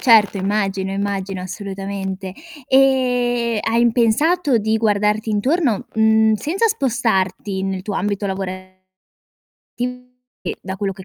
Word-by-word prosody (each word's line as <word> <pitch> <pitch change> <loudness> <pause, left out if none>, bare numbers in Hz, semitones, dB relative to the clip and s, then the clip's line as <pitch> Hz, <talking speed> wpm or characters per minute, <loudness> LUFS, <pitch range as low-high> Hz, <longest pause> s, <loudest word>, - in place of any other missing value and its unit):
Certo, 220 -5 +5
immagino, 195 -1 -1
immagino, 195 -1 -3
assolutamente. 195 0 -5 0.3
Ehm, 245 -4 +2
hai 235 +1 +2
pensato 275 +5 +2
di 220 +1 +1
guardarti 210 0 +1
intorno, 245 - +1
mhmm, 220 0 +4
senza 355 - 0
spostarti 215 - 0
nel 190 -1 -2
tuo 205 +1 -4
ambito 200 +1 -1
lavorativo, 185 -1 -5 1.6
che - - -4
da 190 - -5
quello 195 0 -2
che 190 0 -12
210 Hz, 115 wpm, -20 LUFS, 195-235 Hz, 1.6 s, Certo